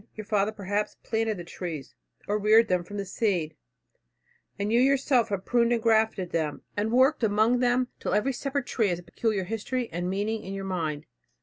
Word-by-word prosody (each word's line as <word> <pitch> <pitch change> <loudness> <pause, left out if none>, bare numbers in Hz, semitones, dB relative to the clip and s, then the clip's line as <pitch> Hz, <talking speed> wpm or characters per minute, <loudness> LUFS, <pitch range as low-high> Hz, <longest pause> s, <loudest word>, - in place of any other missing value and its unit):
Your 215 - -7
father, 205 0 +1
perhaps, 205 0 -3
planted 220 -2 -1
the 175 - -6
trees, 170 -4 -6 0.3
or 210 +1 0
reared 220 +2 +5
them 180 -1 +1
from 205 +4 -8
the 200 - -3
seed, 180 -6 -1 1.0
and 205 +2 -1
you 235 - +5
yourself 270 -2 +3
have 195 -2 -3
pruned 240 -1 +2
and 235 - +2
grafted 220 -5 +2
them, 155 -3 -2
and 210 +2 -1
worked 260 +3 +4
among 220 +3 +3
them, 250 0 +2
till - - -1
every 235 +6 +1
separate 275 +1 -2
tree 225 -4 +1
has 175 -3 0
a 175 - -11
peculiar 215 0 -1
history 225 +5 -3
and 175 +2 -2
meaning 210 +3 -1
in 195 +1 -6
your 195 0 -5
mind. 160 -6 -3
210 Hz, 195 wpm, -27 LUFS, 190-235 Hz, 1.0 s, reared